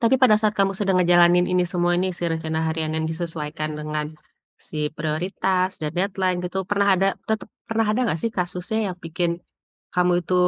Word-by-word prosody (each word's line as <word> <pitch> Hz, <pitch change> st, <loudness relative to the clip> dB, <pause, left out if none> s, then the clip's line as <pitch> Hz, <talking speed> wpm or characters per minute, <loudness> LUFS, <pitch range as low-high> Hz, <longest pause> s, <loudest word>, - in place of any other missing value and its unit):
tapi 230 Hz, +1 st, +4 dB
pada 220 Hz, -5 st, +7 dB
saat 215 Hz, -1 st, +2 dB
kamu 195 Hz, 0 st, +3 dB
sedang 195 Hz, -3 st, +2 dB
ngejalanin 175 Hz, 0 st, +5 dB
ini 180 Hz, 0 st, +3 dB
semua 175 Hz, -1 st, +2 dB
ini, 185 Hz, -, +1 dB
si -, -, -3 dB
rencana 160 Hz, -1 st, -2 dB
harian 160 Hz, -1 st, -1 dB
yang 160 Hz, -, -1 dB
disesuaikan 160 Hz, -2 st, -4 dB
dengan 150 Hz, 0 st, -3 dB, 0.6 s
si -, -, -8 dB, 0.2 s
prioritas 180 Hz, +4 st, 0 dB
dan 150 Hz, -1 st, -3 dB
deadline 185 Hz, -1 st, 0 dB
gitu, 180 Hz, +1 st, -4 dB
pernah 200 Hz, 0 st, +2 dB
ada, 195 Hz, -, +2 dB, 0.2 s
tetep 220 Hz, -1 st, -1 dB, 0.2 s
pernah 225 Hz, 0 st, +1 dB
ada 230 Hz, -, 0 dB
gak 160 Hz, -, 0 dB
sih 230 Hz, -, 0 dB
kasusnya 180 Hz, +3 st, -2 dB
yang 180 Hz, -, -5 dB
bikin 170 Hz, +1 st, -1 dB, 0.6 s
kamu 180 Hz, 0 st, +3 dB
itu, 185 Hz, -, -1 dB
180 Hz, 185 wpm, -23 LUFS, 160-195 Hz, 0.6 s, pada